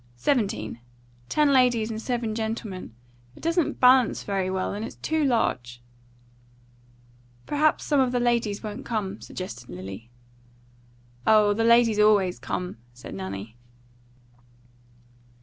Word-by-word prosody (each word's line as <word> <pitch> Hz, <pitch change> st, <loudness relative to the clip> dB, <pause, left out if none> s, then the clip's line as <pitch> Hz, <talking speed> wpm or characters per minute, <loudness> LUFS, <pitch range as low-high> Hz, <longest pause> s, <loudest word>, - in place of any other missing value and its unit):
Seventeen. 205 Hz, -, -1 dB, 0.5 s
Ten 295 Hz, -2 st, +3 dB
ladies 245 Hz, -4 st, +3 dB
and 220 Hz, 0 st, -5 dB
seven 235 Hz, -3 st, -2 dB
gentlemen. 220 Hz, -, -5 dB, 0.4 s
It -, -, -16 dB
doesn't 335 Hz, 0 st, 0 dB
balance 255 Hz, -1 st, +5 dB
very 195 Hz, -2 st, -1 dB
well, 190 Hz, 0 st, -2 dB
and 205 Hz, +2 st, -4 dB
it's -, -, -7 dB
too 315 Hz, -1 st, -1 dB
large." 125 Hz, -, 0 dB, 1.7 s
"Perhaps 305 Hz, +1 st, +1 dB
some 290 Hz, -2 st, +2 dB
of 260 Hz, -2 st, +2 dB
the 250 Hz, -, 0 dB
ladies 235 Hz, -4 st, 0 dB
won't 210 Hz, -1 st, -6 dB
come," 210 Hz, -3 st, -3 dB
suggested 125 Hz, -10 st, -8 dB
Lily. 95 Hz, +5 st, -8 dB, 1.2 s
"Oh, 210 Hz, -1 st, +5 dB
the 225 Hz, +2 st, 0 dB
ladies 230 Hz, -2 st, +4 dB
always 205 Hz, -4 st, +4 dB
come," 180 Hz, -5 st, -4 dB, 0.2 s
said 125 Hz, -, -10 dB
Nanny. 100 Hz, +4 st, -7 dB
215 Hz, 120 wpm, -25 LUFS, 185-245 Hz, 1.7 s, balance